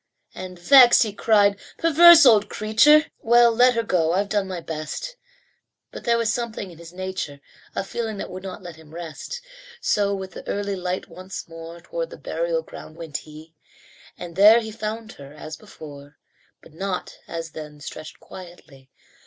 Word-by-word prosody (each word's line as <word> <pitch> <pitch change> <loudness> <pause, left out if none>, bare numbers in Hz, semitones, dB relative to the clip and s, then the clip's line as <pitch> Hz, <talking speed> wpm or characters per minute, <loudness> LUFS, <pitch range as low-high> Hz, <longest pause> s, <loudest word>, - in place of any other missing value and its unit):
And, 185 -1 -8
vexed, 245 +7 +7
he 215 -3 -4
cried, 205 -1 +3 0.2
"Perverse 335 0 +8
old 210 -4 +5
creature! 295 +9 +4
Well, 235 0 +5
let 245 +2 +4
her 230 - 0
go. 170 -6 +1
I've 200 +2 0
done 205 -2 0
my 185 -2 -5
best." 165 - -6 0.8
But - - -10
there 235 0 +3
was 230 -1 0
something 230 -5 -4
in 165 - -15
his 170 0 -12
nature, 185 -6 -5 0.4
A - - -1
feeling 220 +1 -4
that - - -6
would 185 +1 -7
not 190 -1 -8
let 170 -3 -10
him 160 0 -15
rest. 170 - -7 0.4
So 200 - +1
with 190 -1 -7
the - - -11
early 200 -1 -2
light 180 0 -4
once 185 +1 -9
more 165 +1 -10
Toward - - -5
the - - -11
burial - - -2
ground 155 - -12
went 165 -4 -5
he; 155 +1 -13 0.6
And 175 -2 -9
there 210 +4 +7
he 220 -1 -6
found 220 +1 -5
her 140 +1 -13
as 155 +1 -8
before, 145 -2 -13 0.5
But - - -17
not, 185 +2 -5
as 165 -1 -6
then, 150 -1 -10
stretched 155 +1 -9
quietly. 160 -7 -14
190 Hz, 175 wpm, -23 LUFS, 165-225 Hz, 0.8 s, Perverse